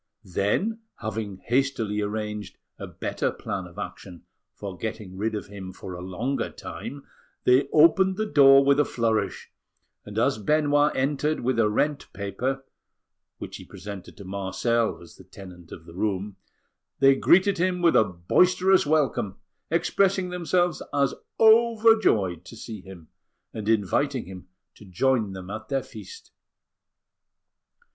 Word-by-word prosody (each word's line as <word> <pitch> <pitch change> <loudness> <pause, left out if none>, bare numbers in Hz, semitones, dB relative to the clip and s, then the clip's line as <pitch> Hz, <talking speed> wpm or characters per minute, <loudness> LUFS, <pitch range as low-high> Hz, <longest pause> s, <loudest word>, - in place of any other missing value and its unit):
Then, 105 - 0 0.2
having 105 -3 -5
hastily 120 -5 0
arranged 105 -1 -4 0.2
a - - -6
better - - -2
plan 95 -2 -5
of 85 - -17
action 90 -3 -8 0.3
for 100 -3 -7
getting 110 -2 -6
rid 110 +3 -2
of 105 - -4
him 95 -2 -9
for 90 0 -9
a 90 - -7
longer 115 +8 -2
time, 140 0 -8 0.4
they 130 +2 +4
opened 175 +5 +5
the 215 - 0
door 135 -6 +6
with 140 +1 +4
a - - +6
flourish, 115 -5 -1 0.5
and - - -9
as - - +2
Benoit 145 +4 +2
entered 145 +3 0
with 120 -1 0
a 110 -2 +4
rent 145 +7 -1
paper, 125 +8 -3 0.7
which - - -7
he - - -11
presented 100 -2 -10
to 100 - -10
Marcel 100 +5 -1
as 85 - -16
the - - -14
tenant 90 -3 -13
of 80 - -10
the 85 - -13
room, 100 +1 -2 0.6
they 135 0 +6
greeted 190 +7 +3
him 180 0 +1
with 170 - +5
a - - +7
boisterous 180 - +3
welcome, 140 -10 +1 0.3
expressing 185 +3 +1
themselves 175 -1 0
as 140 -2 +1 0.3
overjoyed 220 - +4
to 115 - -11
see 110 -2 -8
him, 95 -4 -13 0.4
and 110 -1 -4
inviting 115 +5 +1
him 95 -1 -10 0.3
to - - -16
join 105 +2 0
them 95 0 -8
at 110 +1 -7
their 135 -1 0
feast. 455 -1 -12
115 Hz, 145 wpm, -25 LUFS, 100-150 Hz, 0.7 s, a